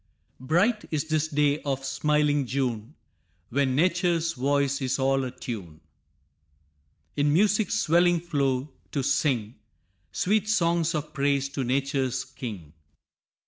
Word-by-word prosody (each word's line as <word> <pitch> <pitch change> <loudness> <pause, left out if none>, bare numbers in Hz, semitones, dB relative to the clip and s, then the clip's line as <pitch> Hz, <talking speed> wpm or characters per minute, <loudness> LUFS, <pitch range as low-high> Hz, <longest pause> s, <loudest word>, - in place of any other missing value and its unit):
Bright 180 - +1
is 155 0 -2
this 155 0 +1
day 150 -1 +1
of 135 -2 -3
smiling 145 0 +1
June, 125 0 -2 0.5
When 135 0 +1
nature's 170 0 +1
voice 140 +1 0
is 130 0 0
all 135 0 +2
atune 110 -10 -7 1.4
In 145 0 +2
music's 205 +6 +2
swelling 175 -3 +3
flow, 140 -4 -1 0.2
to 140 - 0
sing 120 -6 0 0.5
Sweet 210 +2 0
songs 170 -4 +2
of 150 0 -4
praise 140 -1 +1
to 140 -1 -3
nature's 135 0 -1
king. 105 - -8
140 Hz, 115 wpm, -26 LUFS, 130-165 Hz, 1.4 s, swelling